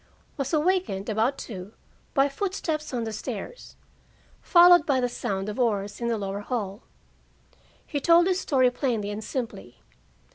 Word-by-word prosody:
Was 275 -4 -3
awakened 315 - 0
about 225 +6 +1
two 195 -1 -8 0.4
by 275 -1 +4
footsteps 315 -1 -3
on 245 -3 -2
the 220 -1 -4
stairs, 485 - -7 0.7
followed 350 0 +7
by 275 -3 +3
the 250 - +1
sound 195 -5 -3
of 210 +4 -5
oars 205 -3 -1
in 235 - -1
the 230 -1 0
lower 200 -1 -4
hall. 205 -2 -4 1.0
He 290 - -3
told 335 +4 +5
his 370 0 +1
story 255 -7 +2
plainly 230 -6 -1
and 210 +1 -5
simply. 205 - -6
245 Hz, 150 wpm, -26 LUFS, 205-305 Hz, 1.0 s, followed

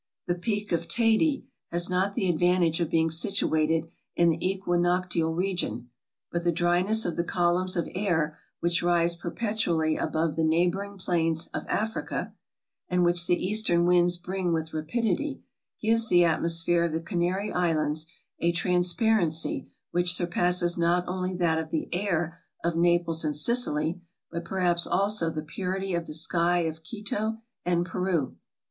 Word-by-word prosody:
The 175 - +1
Peak 205 +3 -3
of 170 0 0
Teyde 235 - +2 0.3
has 175 +1 -1
not 190 +2 0
the 200 -6 0
advantage 175 -1 +2
of 170 -3 0
being 160 0 +2
situated 160 -3 +1 0.3
in 170 0 +4
the 165 0 -1
equinoctial 175 -3 0
region; 170 - -2 0.4
but 170 0 -2
the 175 - +3
dryness 175 +6 +1
of 175 - -2
the 170 - +1
columns 180 +2 +1
of 170 - 0
air 170 -5 0 0.2
which 170 0 +1
rise 170 -1 +2
perpetually 170 -4 -1
above 160 -1 -1
the 165 - 0
neighboring 180 +5 +1
plains 165 -3 0
of - - -4
Africa, 220 +1 -2 0.6
and 180 -1 +2
which 175 0 +2
the 175 0 +1
eastern 190 -5 +2
winds 175 0 +4
bring 180 0 -2
with 160 -1 -2
rapidity, 230 - -1 0.4
gives 225 +1 +2
the 175 -1 +6
atmosphere 170 +1 +1
of 165 - -2
the 160 - 0
Canary 175 +4 -1
Islands 160 -3 0 0.3
a 170 - +2
transparency 180 0 +1 0.2
which 175 0 +3
surpasses 175 0 +1
not 170 +1 +3
only 185 0 -2
that 165 -3 +1
of 160 -1 -5
the 160 - -2
air 175 -3 -1 0.2
of 170 -1 0
Naples 170 -1 +2
and 150 -2 -1
Sicily, 170 -3 +1 0.3
but 170 0 -5
perhaps 175 -2 +1
also 200 -3 +1
the 155 -1 -4
purity 190 +3 -3
of 170 -1 -2
the 150 - -5
sky 170 +2 +1
of 160 -1 -3
Quito 215 +4 -2 0.3
and 175 -1 +1
Peru. 180 -6 -1
175 Hz, 155 wpm, -27 LUFS, 165-185 Hz, 0.6 s, the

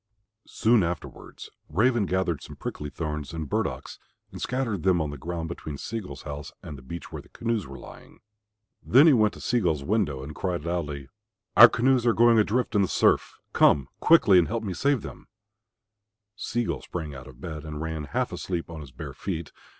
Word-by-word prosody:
Soon 115 0 +3
afterwards 85 0 -6 0.2
Raven 110 +4 +2
gathered 90 -5 0
some - - -10
prickly 75 - -5
thorns 75 -2 -5
and 80 -2 -4
burdocks - - -3 0.3
and - - -9
scattered 120 -7 -1
them 90 -1 +3
on 75 -2 -2
the - - -6
ground 85 +2 -4
between 80 -3 -6
Sea 115 +10 -4
gull's 100 - -9
house 75 0 -7
and 75 - -7
the 65 - -11
beach 85 +7 -8
where - - -6
the - - -22
canoes 115 -6 -2
were 70 0 -9
lying. - - -13 0.6
Then 135 +6 +6
he 160 - +7
went 110 -4 +3
to - - -11
Sea 120 - +1
gull's 80 -8 0
window 90 -9 0
and 75 +3 -7
cried 85 -2 -3
loudly, 75 -5 -3 0.5
"Our 120 +2 +11
canoes 125 0 +2
are 115 - +5
going 115 0 +5
adrift 115 +3 +1
in 105 - +3
the 95 - +2
surf. - - +2 0.2
Come 70 -2 +4
quickly 105 - +6
and 85 - +2
help 115 0 -3
me 100 -4 -3
to - - -9
save 140 -4 +2
them." - - -10 1.1
Sea 120 +3 -2
gull - - -3
sprang 80 -4 -6
out 70 0 -10
of 65 -2 -14
bed 75 -1 -6
and 75 -1 -6
ran 80 -1 -4
half - - -2
asleep 85 -3 -4
on 80 -1 -7
his 70 - -10
bare 60 - -8
feet. 85 -4 -5
85 Hz, 205 wpm, -26 LUFS, 75-110 Hz, 1.1 s, Our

